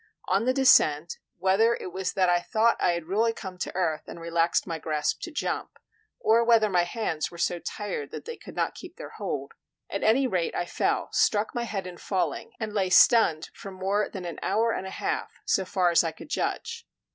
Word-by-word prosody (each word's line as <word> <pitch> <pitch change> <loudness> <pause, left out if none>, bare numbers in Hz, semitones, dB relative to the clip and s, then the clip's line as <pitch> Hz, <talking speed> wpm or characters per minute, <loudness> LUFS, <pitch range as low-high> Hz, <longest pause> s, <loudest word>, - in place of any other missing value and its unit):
On 195 +5 +2
the 255 - +3
descent, 170 - +4 0.2
whether 195 +6 +3
it 180 - -8
was 190 0 -2
that 185 -1 +2
I 175 0 +4
thought 220 +6 +2
I 175 - +3
had 170 -1 -3
really 220 +6 +1
come 190 -4 -8
to - - -4
earth 160 -4 -1
and - - -8
relaxed 170 0 +1
my 165 -3 -4
grasp 150 -1 -1
to 340 - -5
jump, 295 - -3 0.4
or 230 +2 +4
whether 225 -3 +4
my 175 -1 +3
hands 175 -5 -2
were 170 - -12
so 175 +1 0
tired 190 -7 -5
that - - -8
they 475 +1 -6
could - - -12
not - - 0
keep - - -11
their - - -9
hold, - - -4 0.4
at - - -2
any 250 +5 +4
rate 180 -9 -1
I 175 - -1
fell, - - -1
struck 210 0 +2
my 240 -1 -2
head 195 -5 -4
in 180 -1 -8
falling, 175 -7 -2
and 220 -2 -4
lay 195 -3 +1
stunned 180 -5 +5
for 195 - -9
more 195 +2 -1
than 185 -2 -7
an 170 - -6
hour 225 +4 +1
and 190 - -3
a - - -5
half, - - -3
so 190 - +1
far 180 -1 +2
as 170 - +5
I 165 - -1
could - - -12
judge. 465 +7 -3
190 Hz, 215 wpm, -27 LUFS, 175-225 Hz, 0.4 s, stunned